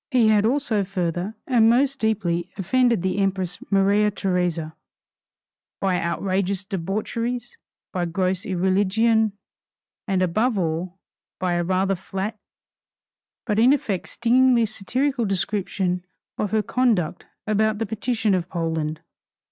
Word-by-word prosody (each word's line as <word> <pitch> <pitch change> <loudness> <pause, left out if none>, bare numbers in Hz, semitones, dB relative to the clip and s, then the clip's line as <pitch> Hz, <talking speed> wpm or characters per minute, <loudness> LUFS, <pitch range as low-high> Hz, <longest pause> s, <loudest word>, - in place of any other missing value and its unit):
He 245 -6 +4
had 215 0 +4
also 240 -5 +1
further 185 +1 -2
and 230 -4 +4
most 270 +3 +2
deeply 185 -6 0
offended 235 +1 +2
the 190 +1 0
Empress 195 -1 -1
Maria 200 +1 +3
Theresa, 180 -5 -1 1.1
by 185 -2 +1
outrageous 190 +2 -1
debaucheries, 215 +6 -3 0.3
by 180 -1 0
gross 185 +2 -1
irreligion, 205 +3 +2 0.7
and 190 -2 +1
above 215 +6 +1
all 175 +1 -2 0.4
by 180 -1 0
a 175 0 +1
rather 190 +2 +1
flat 195 +3 -4 1.1
but 210 -2 0
in 250 +4 +6
effect 205 -10 -2
stingingly 245 0 +3
satirical 245 +5 -1
description 190 -2 -1 0.3
of 210 - -2
her 215 +1 +1
conduct 215 -12 0 0.2
about 215 0 +1
the 225 - -1
partition 220 0 0
of 180 -1 -1
Poland. 160 -2 -2
195 Hz, 120 wpm, -23 LUFS, 180-225 Hz, 1.1 s, in